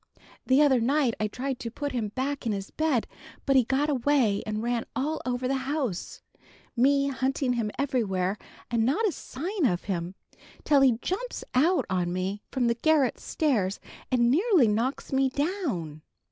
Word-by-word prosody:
The 265 Hz, +3 st, +5 dB
other 265 Hz, -4 st, +4 dB
night 265 Hz, +1 st, +2 dB
I 215 Hz, -, +1 dB
tried 260 Hz, +4 st, -4 dB
to 230 Hz, -, -4 dB
put 285 Hz, +5 st, -4 dB
him 235 Hz, -4 st, -1 dB
back 270 Hz, 0 st, -2 dB
in 220 Hz, -, +1 dB
his 195 Hz, 0 st, -5 dB
bed, 310 Hz, -7 st, +1 dB, 0.4 s
but 275 Hz, -, +2 dB
he 260 Hz, -, +6 dB
got 270 Hz, +4 st, +1 dB
away 260 Hz, -7 st, +2 dB
and 215 Hz, +1 st, -2 dB
ran 240 Hz, -1 st, -1 dB
all 305 Hz, +4 st, -1 dB
over 250 Hz, 0 st, -1 dB
the 270 Hz, -, 0 dB, 0.2 s
house, 265 Hz, -, -3 dB, 0.5 s
me 275 Hz, +3 st, +3 dB
hunting 265 Hz, -1 st, 0 dB
him 230 Hz, -3 st, -1 dB
everywhere, 210 Hz, -8 st, 0 dB, 0.3 s
and 230 Hz, -1 st, +2 dB
not 305 Hz, -, +2 dB
a -, -, +1 dB
sign 340 Hz, +7 st, -4 dB
of 180 Hz, -4 st, -1 dB
him, 180 Hz, -1 st, -3 dB, 0.5 s
till 285 Hz, -2 st, +4 dB
he 255 Hz, -4 st, +5 dB
jumps -, -, -3 dB
out 330 Hz, +9 st, +3 dB
on 180 Hz, -2 st, -1 dB
me 185 Hz, +3 st, -3 dB
from 255 Hz, -3 st, 0 dB
the 235 Hz, -, +3 dB
garret 285 Hz, +2 st, +2 dB
stairs 220 Hz, -, 0 dB, 0.3 s
and 240 Hz, -2 st, +3 dB
nearly 355 Hz, -, +4 dB
knocks 235 Hz, +7 st, -1 dB
me 265 Hz, 0 st, +3 dB
down. 270 Hz, -, -2 dB
255 Hz, 175 wpm, -27 LUFS, 220-285 Hz, 0.5 s, he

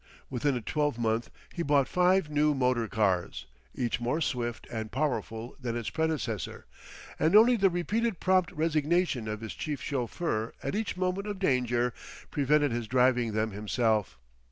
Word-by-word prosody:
Within 135 Hz, +2 st, 0 dB
a 120 Hz, -, -2 dB
twelve 145 Hz, +2 st, -1 dB
month 115 Hz, 0 st, 0 dB, 0.2 s
he 170 Hz, -, -3 dB
bought 145 Hz, -4 st, +3 dB
five 180 Hz, -1 st, +3 dB
new 150 Hz, 0 st, +2 dB
motor 125 Hz, -3 st, +1 dB
cars, 95 Hz, -10 st, 0 dB, 0.3 s
each 120 Hz, -1 st, -1 dB
more 125 Hz, +7 st, 0 dB
swift 120 Hz, -6 st, -2 dB
and 110 Hz, -2 st, -4 dB
powerful 120 Hz, -4 st, -2 dB
than 120 Hz, -3 st, -3 dB
its 115 Hz, -, -4 dB
predecessor, 155 Hz, -10 st, -2 dB, 0.5 s
and 160 Hz, +6 st, +3 dB
only 235 Hz, +3 st, +7 dB
the 195 Hz, -3 st, +4 dB
repeated 205 Hz, +4 st, -1 dB
prompt 185 Hz, -3 st, +2 dB
resignation 155 Hz, -4 st, +1 dB
of 105 Hz, 0 st, -4 dB
his 110 Hz, -, -5 dB
chief 150 Hz, -3 st, -4 dB
chauffeur 125 Hz, -3 st, -2 dB
at -, -, -2 dB
each 210 Hz, -2 st, -2 dB
moment 185 Hz, +2 st, -1 dB
of 205 Hz, -1 st, -3 dB
danger, 125 Hz, -8 st, +1 dB, 0.4 s
prevented 145 Hz, 0 st, +2 dB
his 115 Hz, -1 st, -2 dB
driving 125 Hz, -2 st, +2 dB
them 110 Hz, +1 st, 0 dB
himself. 105 Hz, -, 0 dB
130 Hz, 155 wpm, -29 LUFS, 115-165 Hz, 0.5 s, only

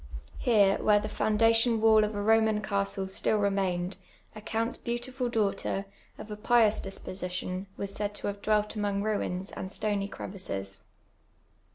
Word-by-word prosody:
Here, 205 Hz, -5 st, +4 dB
where 210 Hz, -1 st, +5 dB
tlic -, -, -5 dB
foundation 225 Hz, +2 st, +3 dB
wall 220 Hz, -1 st, +6 dB
of 210 Hz, 0 st, -2 dB
a 205 Hz, -, -2 dB
Koman 220 Hz, 0 st, +3 dB
castle 200 Hz, -1 st, -1 dB
still 190 Hz, +3 st, 0 dB
re 200 Hz, -1 st, +2 dB
mained, 185 Hz, -1 st, -1 dB, 0.4 s
a 215 Hz, -, -8 dB
counts 225 Hz, +2 st, -1 dB
beautiful 245 Hz, +1 st, -3 dB
dau<jhter, 205 Hz, -3 st, 0 dB, 0.3 s
of 215 Hz, -, -9 dB
a 210 Hz, -, -5 dB
j)ious 220 Hz, -1 st, +3 dB
disposition, 185 Hz, -1 st, -4 dB
wa.s 200 Hz, -1 st, -3 dB
said 205 Hz, 0 st, -3 dB
to -, -, -6 dB
have 200 Hz, 0 st, -3 dB
dwelt 210 Hz, 0 st, +2 dB
amonj:: 205 Hz, -2 st, -1 dB
ruins 195 Hz, -3 st, -2 dB
and 190 Hz, -, -6 dB
stony 205 Hz, -2 st, -1 dB
crevices. 100 Hz, -, -6 dB
205 Hz, 155 wpm, -29 LUFS, 195-220 Hz, 0.4 s, wall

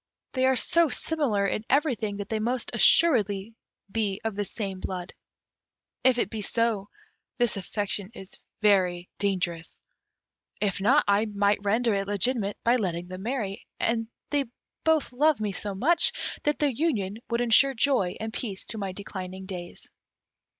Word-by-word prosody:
They 260 Hz, 0 st, +2 dB
are 265 Hz, -, +4 dB
so 335 Hz, +6 st, +4 dB
similar 260 Hz, -9 st, 0 dB
in 210 Hz, +2 st, -1 dB
everything, 250 Hz, -8 st, +1 dB
that 205 Hz, -1 st, -6 dB
they 220 Hz, -, -1 dB
must 240 Hz, +3 st, -1 dB
assuredly 215 Hz, -, +4 dB, 0.4 s
be 205 Hz, -3 st, -1 dB
of 225 Hz, -2 st, -2 dB
the 205 Hz, 0 st, -1 dB
same 195 Hz, -2 st, -5 dB
blood. 185 Hz, -1 st, -5 dB, 0.9 s
If 260 Hz, -2 st, +5 dB
it 210 Hz, -, 0 dB
be 220 Hz, -, -4 dB
so, 220 Hz, -2 st, 0 dB, 0.5 s
this 240 Hz, -2 st, +1 dB
affection 200 Hz, 0 st, -3 dB
is 190 Hz, -, -10 dB, 0.2 s
very 180 Hz, -4 st, +3 dB
dangerous; 175 Hz, -4 st, -1 dB, 0.8 s
if 200 Hz, -1 st, -1 dB
not, 265 Hz, +9 st, +5 dB
I 205 Hz, +2 st, +3 dB
might 205 Hz, -1 st, +1 dB
render 225 Hz, +3 st, +2 dB
it 195 Hz, 0 st, -1 dB
legitimate 205 Hz, 0 st, 0 dB
by 240 Hz, +2 st, +4 dB
letting 175 Hz, -5 st, -3 dB
them 185 Hz, 0 st, -7 dB
marry; 220 Hz, -4 st, -3 dB
and 225 Hz, -1 st, 0 dB, 0.2 s
they 285 Hz, -2 st, +1 dB, 0.4 s
both 315 Hz, -5 st, +2 dB
love 295 Hz, +1 st, +3 dB
me 210 Hz, -1 st, -1 dB
so 200 Hz, +1 st, -3 dB
much, 330 Hz, -, +3 dB, 0.3 s
that 295 Hz, 0 st, +1 dB
their 295 Hz, -, +2 dB
union 225 Hz, -, -1 dB
would 235 Hz, 0 st, 0 dB
ensure 250 Hz, +3 st, +5 dB
joy 225 Hz, -8 st, +2 dB
and 220 Hz, 0 st, -4 dB
peace 205 Hz, -5 st, -4 dB
to 220 Hz, -, -3 dB
my 195 Hz, -2 st, -3 dB
declining 190 Hz, -1 st, -7 dB
days." 180 Hz, -2 st, -6 dB
210 Hz, 155 wpm, -27 LUFS, 195-245 Hz, 0.9 s, If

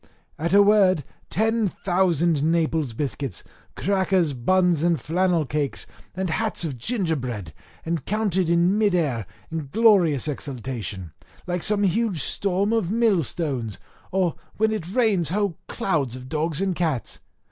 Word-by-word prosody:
At 170 Hz, +2 st, -1 dB
a 200 Hz, +1 st, +7 dB
word, 195 Hz, -6 st, +4 dB, 0.3 s
ten 220 Hz, +2 st, +1 dB
thousand -, -, -10 dB, 0.5 s
thousand 140 Hz, -, -1 dB
Naples 160 Hz, -6 st, 0 dB
biscuits, 135 Hz, 0 st, -3 dB, 0.3 s
crackers, 190 Hz, -5 st, +1 dB
buns, 175 Hz, +5 st, +2 dB
and 170 Hz, -1 st, +2 dB
flannel 175 Hz, 0 st, +1 dB
cakes, 140 Hz, +1 st, -2 dB, 0.3 s
and 185 Hz, -2 st, -2 dB
hats 220 Hz, +2 st, -1 dB
of 140 Hz, -7 st, -4 dB
gingerbread 130 Hz, -, -2 dB, 0.3 s
encountered 185 Hz, +2 st, 0 dB
in 175 Hz, +4 st, +3 dB
mid 205 Hz, -4 st, +3 dB
air 130 Hz, -, 0 dB, 0.2 s
in 160 Hz, -3 st, -4 dB
glorious 190 Hz, -, +4 dB
exaltation, 120 Hz, -, -5 dB, 0.3 s
like 180 Hz, -1 st, -2 dB
some 205 Hz, +2 st, +2 dB
huge 195 Hz, -, +1 dB
storm 200 Hz, +2 st, 0 dB
of 220 Hz, -7 st, +1 dB
mill 220 Hz, -4 st, +3 dB
stones, 130 Hz, -, -3 dB, 0.3 s
or 185 Hz, -3 st, +1 dB, 0.2 s
when 220 Hz, +1 st, +2 dB
it 185 Hz, -5 st, -4 dB
rains 210 Hz, -8 st, +2 dB
whole 200 Hz, -2 st, -1 dB
clouds 145 Hz, -10 st, -1 dB
of 130 Hz, 0 st, -9 dB
dogs 155 Hz, +3 st, -1 dB
and 190 Hz, -2 st, 0 dB
cats. 160 Hz, -9 st, -2 dB
170 Hz, 140 wpm, -24 LUFS, 145-200 Hz, 0.5 s, a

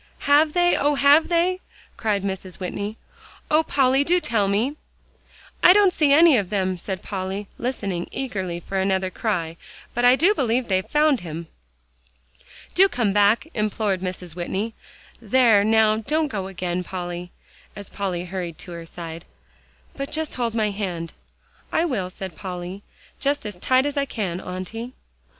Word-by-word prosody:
"Have 300 Hz, +2 st, +5 dB
they? 350 Hz, 0 st, +3 dB
oh! 290 Hz, +1 st, +2 dB
have 285 Hz, +3 st, +5 dB
they?" 360 Hz, +2 st, +1 dB, 0.4 s
cried 210 Hz, -3 st, -1 dB
Mrs. 190 Hz, -2 st, -5 dB
Whitney. 200 Hz, +4 st, -4 dB, 0.5 s
"Oh, 305 Hz, +1 st, +5 dB
Polly! 270 Hz, -3 st, +2 dB
do 355 Hz, +4 st, +3 dB
tell 230 Hz, -, +1 dB
me." 220 Hz, +9 st, 0 dB, 0.9 s
"I 360 Hz, -, +8 dB
don't 400 Hz, -2 st, +5 dB
see 300 Hz, -4 st, +3 dB
any 315 Hz, -1 st, +7 dB
of 195 Hz, -5 st, -1 dB
them," 190 Hz, -3 st, 0 dB
said 185 Hz, +1 st, -5 dB
Polly, 195 Hz, +1 st, -4 dB
listening 200 Hz, -8 st, -3 dB
eagerly 190 Hz, -10 st, -3 dB
for 195 Hz, +2 st, -3 dB
another 190 Hz, -1 st, 0 dB
cry, 170 Hz, -7 st, -2 dB, 0.4 s
"but 240 Hz, -, -1 dB
I 245 Hz, +1 st, +7 dB
do 350 Hz, +9 st, +4 dB
believe 250 Hz, -, 0 dB
they've 185 Hz, -1 st, 0 dB
found 300 Hz, -3 st, +3 dB
him." 165 Hz, -1 st, -7 dB, 1.2 s
"Do 390 Hz, +2 st, +5 dB
come 225 Hz, -, 0 dB
back," 205 Hz, +7 st, +3 dB
implored 210 Hz, -3 st, -1 dB
Mrs. 180 Hz, -3 st, -5 dB
Whitney; 195 Hz, +5 st, -3 dB, 0.5 s
"there, 230 Hz, -2 st, +4 dB
now, 220 Hz, 0 st, +4 dB
don't 300 Hz, +7 st, 0 dB
go 195 Hz, -5 st, -3 dB
again, 180 Hz, -1 st, -3 dB
Polly," 175 Hz, -1 st, -6 dB, 0.4 s
as 200 Hz, -1 st, -8 dB
Polly 185 Hz, -3 st, -3 dB
hurried 175 Hz, -3 st, -5 dB
to 180 Hz, -, -9 dB
her 170 Hz, -1 st, -8 dB
side, 165 Hz, -1 st, -8 dB, 0.7 s
"but 275 Hz, 0 st, -5 dB
just 315 Hz, 0 st, -2 dB
hold 235 Hz, -2 st, -2 dB
my 215 Hz, -2 st, +1 dB
hand." 180 Hz, -5 st, -4 dB, 0.6 s
"I 330 Hz, -, +2 dB
will," 210 Hz, -, -2 dB
said 185 Hz, -1 st, -8 dB
Polly, 180 Hz, +1 st, -6 dB, 0.4 s
"just 285 Hz, -2 st, 0 dB
as 205 Hz, -3 st, -6 dB
tight 255 Hz, +6 st, +3 dB
as 290 Hz, 0 st, -2 dB
I 280 Hz, -, +2 dB
can, 190 Hz, -9 st, -3 dB
Auntie." 220 Hz, +7 st, -6 dB
210 Hz, 160 wpm, -23 LUFS, 185-270 Hz, 1.2 s, I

